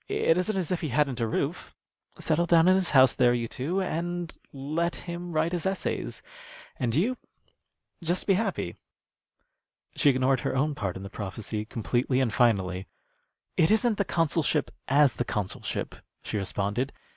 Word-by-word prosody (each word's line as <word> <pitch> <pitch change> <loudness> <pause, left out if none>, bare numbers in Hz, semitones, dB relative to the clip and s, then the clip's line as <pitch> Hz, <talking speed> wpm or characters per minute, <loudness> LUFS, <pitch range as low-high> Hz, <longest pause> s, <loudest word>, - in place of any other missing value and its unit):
It 165 - +2
isn't 195 +3 0
as 185 -3 -2
if 180 - 0
he 155 - -2
hadn't 140 -1 +1
a 115 - +1
roof. - - -3 0.4
Settle 170 +2 +1
down 165 0 +5
in 185 - +7
his 185 -2 +2
house 130 -3 +6
there, 120 -1 +3
you 120 -1 -2
two, 165 +12 -2
and 175 -1 -3 0.2
let 155 +5 -2
him 175 0 -5
write 160 +1 +1
his 175 +1 -1
essays, 190 - -3 0.5
and 120 -2 -1
you 230 - +1 0.9
just 175 +2 0
be 195 - +4
happy." 190 - -2 1.2
She 145 - +4
ignored 130 0 +2
her - - -2
own 145 +3 +1
part 100 -9 -3
in 95 - -8
the 100 - -8
prophecy 105 +1 -5
completely 120 +4 0
and 125 -4 +1
finally. 95 -6 +1 0.7
"It 160 - +4
isn't 220 0 +3
the - - +4
consulship 160 -5 +1 0.2
as 140 0 +4
the - - +1
consulship," 105 -5 -3 0.3
she - - -5
responded. 105 +6 -1
145 Hz, 165 wpm, -27 LUFS, 120-175 Hz, 1.2 s, in